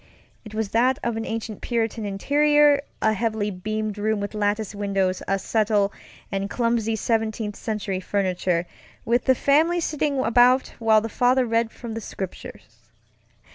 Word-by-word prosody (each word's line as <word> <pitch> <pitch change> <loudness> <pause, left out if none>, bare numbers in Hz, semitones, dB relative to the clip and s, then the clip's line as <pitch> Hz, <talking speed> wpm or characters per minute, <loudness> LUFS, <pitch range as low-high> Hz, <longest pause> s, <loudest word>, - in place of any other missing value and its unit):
It 215 -1 -10
was 220 -2 -1
that 250 +4 +2
of 235 -1 -1
an 225 0 -4
ancient 225 -2 -5
Puritan 225 -2 -1
interiorŌĆöa 290 +8 +3 0.3
heavily 215 -1 -1
beamed 215 +2 -4
room 215 0 0
with 205 +1 -4
lattice 210 0 -1
windows, 195 -2 -1
a 195 - +1
settle, 205 0 +1 0.4
and 195 0 -2
clumsy 230 -2 0
Seventeenth 220 -1 -1
Century 205 -4 -3
furniture, 185 -3 -1 0.4
with 240 +2 +1
the 260 - +4
family 315 +7 +3
sitting 300 -3 -1
about 250 +2 +4
while 220 -2 +4
the 225 - -3
father 250 +3 +2
read 230 0 +1
from 235 -2 -8
the 225 - -5
Scriptures. 190 -3 -9
220 Hz, 145 wpm, -24 LUFS, 205-240 Hz, 0.4 s, the